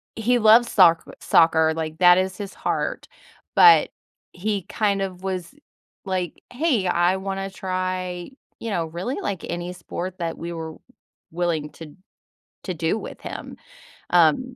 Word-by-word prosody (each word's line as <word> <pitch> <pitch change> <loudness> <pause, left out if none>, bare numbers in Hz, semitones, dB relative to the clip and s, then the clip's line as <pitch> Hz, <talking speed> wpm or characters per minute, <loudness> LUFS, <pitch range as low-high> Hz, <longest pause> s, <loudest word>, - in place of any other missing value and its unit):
he 240 +3 +2
loves 230 +2 +6
soc 170 -4 +5 0.2
soccer, 160 -1 +4
like, 160 -1 -4
that 175 +1 +7
is 185 0 -1
his 205 -2 -7
heart, - - -3 0.5
but 430 - +7 0.4
he 200 +2 -2
kind 200 +1 -1
of 185 -1 -5
was 185 +1 -4 0.5
like, 185 -3 -3
"Hey, 255 - +1
I 175 +1 +2
wanna 195 0 -4
try" 185 -1 -4 0.3
you 230 - -5
know, 175 -6 -1
really, 175 - -4
like, 195 - -4
any 175 +1 -4
sport 180 +1 -6
that 165 -1 -3
we 170 +1 -6
were 160 -1 -6 0.6
willing 165 -3 -1
to 155 -3 -12 0.7
to 185 - -3
do 165 +5 -1
with - - -9
him, - - -8 0.6
um, 175 - +3
185 Hz, 145 wpm, -23 LUFS, 170-195 Hz, 0.7 s, that